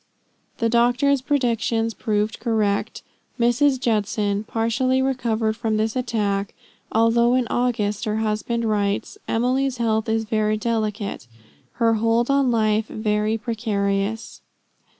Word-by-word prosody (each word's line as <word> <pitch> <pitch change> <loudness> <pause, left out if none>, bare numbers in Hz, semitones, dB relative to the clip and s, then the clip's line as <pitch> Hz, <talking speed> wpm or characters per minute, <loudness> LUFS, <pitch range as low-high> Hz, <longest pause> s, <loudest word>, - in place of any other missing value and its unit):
The 230 - +1
doctor's 245 +4 +2
predictions 230 -4 0
proved 215 -1 -1
correct; 215 -3 -1 0.4
Mrs. 250 +3 +3
Judson 210 -3 0
partially 235 +4 0
recovered 235 -5 0
from 220 -2 -1
this 220 +2 -1
attack, 210 -5 -1 0.4
although 235 +2 +3
in 255 -1 +2
August 220 -4 0
her 215 0 -1
husband 220 +2 -1
writes: 205 - -1
"Emily's 255 +3 0
health 220 -1 0
is 225 0 +1
very 215 -1 0
delicate 215 - -2 0.5
her 230 -2 +2
hold 230 +3 +1
on 275 -2 +3
life 220 -2 +1
very 215 0 -1
precarious." 210 -2 -2
225 Hz, 115 wpm, -22 LUFS, 215-240 Hz, 0.5 s, Mrs